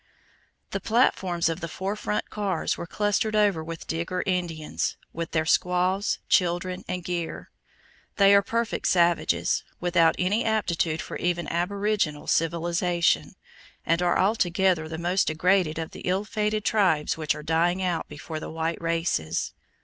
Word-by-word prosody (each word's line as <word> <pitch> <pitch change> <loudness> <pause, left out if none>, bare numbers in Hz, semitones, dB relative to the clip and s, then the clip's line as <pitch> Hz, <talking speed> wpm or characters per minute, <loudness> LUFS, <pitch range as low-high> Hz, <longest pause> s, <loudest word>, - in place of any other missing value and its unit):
The 195 - -2
platforms 190 -6 +2
of 165 +1 -2
the 170 - -4
four 190 +5 -3
front 210 0 -3
cars 200 -5 -1
were 170 - -7
clustered 210 +3 0
over 205 -6 +3
with 165 0 -7
Digger 170 +3 -2
Indians, 175 -5 -2 0.2
with 170 0 -4
their 155 -1 0
squaws, 180 +4 +1
children, 180 0 +1
and 180 -1 -3
gear. 170 -1 -4 0.6
They 200 -1 +6
are 200 - +7
perfect 230 +3 -1
savages, 175 -2 +2 0.2
without 175 -2 +3
any 200 +6 +1
aptitude 175 -7 0
for - - -6
even 175 -2 -1
aboriginal 195 -3 -1
civilization, 170 +1 +1 0.5
and 165 +1 +2
are 175 -1 +2
altogether 185 -4 +2
the 160 - -5
most 175 +3 +1
degraded 175 0 +2
of 160 -1 -4
the - - -10
ill 190 +3 0
fated 210 0 -1
tribes 180 -9 +2
which 155 -2 -1
are 150 - -8
dying 170 +4 +1
out 175 -3 -1
before 155 -1 -6
the - - -7
white 165 +1 -3
races. 165 - -1
175 Hz, 150 wpm, -26 LUFS, 165-195 Hz, 0.6 s, are